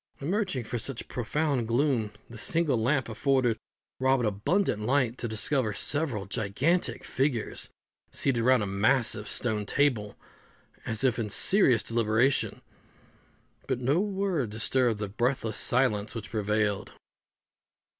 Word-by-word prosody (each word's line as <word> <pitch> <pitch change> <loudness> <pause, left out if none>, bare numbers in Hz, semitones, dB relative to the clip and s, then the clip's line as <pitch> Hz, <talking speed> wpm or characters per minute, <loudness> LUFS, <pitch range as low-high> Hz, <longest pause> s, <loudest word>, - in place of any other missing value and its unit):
Emerging 180 - -1
from 120 +2 -4
such 125 +1 -3
profound 130 0 -1
gloom, 120 -3 +1 0.2
the 115 - -12
single 145 +1 +1
lamp 130 +1 +1
afforded 120 +1 +1 0.4
Robin 130 -1 +2
abundant 105 - 0
light 125 +1 +1
to 120 - -4
discover 110 0 0
several 140 -9 -1
gigantic 120 - 0
figures 130 -4 -1 0.4
seated 125 -4 0
round 125 -2 +4
a - - -1
massive 105 +2 +1
stone 110 -4 -1
table, 110 -3 0 0.7
as 115 +2 -2
if 125 -3 +2
in 110 -2 -2
serious 130 - +3
deliberation, 115 +3 +1 1.0
but - - -1
no 135 +6 +2
word 190 - -1
disturbed 115 +1 +1
the 105 0 -3
breathless 115 +1 -1
silence 110 -4 +1
which 110 -2 -6
prevailed. 105 -1 -1
120 Hz, 125 wpm, -28 LUFS, 110-135 Hz, 1.0 s, round